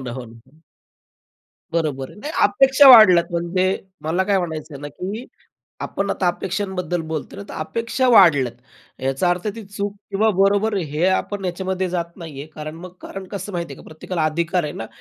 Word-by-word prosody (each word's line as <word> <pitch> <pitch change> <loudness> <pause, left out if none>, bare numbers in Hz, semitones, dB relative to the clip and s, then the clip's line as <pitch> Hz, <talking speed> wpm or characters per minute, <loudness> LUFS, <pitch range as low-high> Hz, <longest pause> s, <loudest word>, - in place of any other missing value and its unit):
ना, 125 -2 -6
हो 125 -1 -6
ना. 120 +7 -18 1.1
बरोबर 145 -5 -1
आहे, 210 - -14
नाही 300 +6 -5
अपेक्षा 265 +6 +6
वाढल्या 215 -8 +9
आहेत. - - -18
म्हणजे 185 +2 0 0.2
मला 165 +4 0
काय 200 0 +2
म्हणायचं 160 -3 -5
आहे 140 - -9
ना 145 - -5
की 195 - -6 0.6
आपण 195 0 -2
आता 185 - -1
अपेक्षांबद्दल 185 -1 -2
बोलतोय 155 -2 -5
ना, - - -6
तर - - -8
अपेक्षा 230 +9 -1
वाढल्या 145 - +6
आहेत. 125 +2 -25
याचा 135 +7 +1
अर्थ 180 +3 -2
ती 225 - -8
चूक 200 0 -4 0.2
किंवा 215 +3 +2
बरोबर, 200 +2 +3
हे 155 -1 -1
आपण 195 +1 -1
ह्याच्यामध्ये 185 +1 -2
जात 170 -1 -4
नाहीये 155 -5 -8
कारण 155 +1 -7
मग 180 +2 -10
कारण 195 -1 -8
कसं 200 +1 -5
माहिती 170 -1 -4
का - - -14
प्रत्येकाला 160 +1 -4
अधिकार 170 +3 0
आहे 150 - -4
ना 115 - -6
180 Hz, 185 wpm, -21 LUFS, 155-200 Hz, 1.1 s, वाढल्या